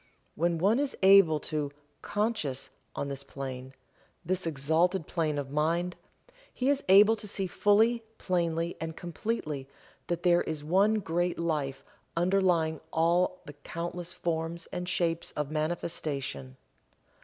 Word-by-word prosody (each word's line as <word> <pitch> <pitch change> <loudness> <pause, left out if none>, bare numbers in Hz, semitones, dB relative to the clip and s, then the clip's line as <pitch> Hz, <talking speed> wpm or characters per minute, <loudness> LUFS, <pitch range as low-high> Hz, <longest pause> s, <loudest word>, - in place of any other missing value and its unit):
When 170 +1 +1
one 200 +9 +3
is 285 -1 -1
able 190 -5 +7
to 150 -2 -2 0.3
"conscious" 205 - -2 0.2
on 140 - -2
this 140 0 -5
plane 130 -1 -7 0.5
this 185 0 -1
exalted 160 +4 +1
plane 155 -3 -1
of 140 -1 -4
mind 170 +4 0 0.6
he 260 +2 0
is 285 -1 0
able 205 +4 +8
to 210 - -8
see 195 -1 -2
fully, 220 +5 +3
plainly 170 -2 -1
and 160 0 -4
completely 160 -7 -4 0.4
that 175 0 -2
there 175 -1 +5
is 155 -2 -4
One 195 +7 +3
Great 175 0 -1
Life 150 -5 -2 0.3
underlying 175 -3 +2
all 175 +3 +2
the 145 - -9
countless 170 +4 -6
forms 170 -1 -3
and 180 0 -3
shapes 170 -2 -1
of 150 -1 -3
manifestation. 155 -4 -3
170 Hz, 130 wpm, -29 LUFS, 155-185 Hz, 0.6 s, able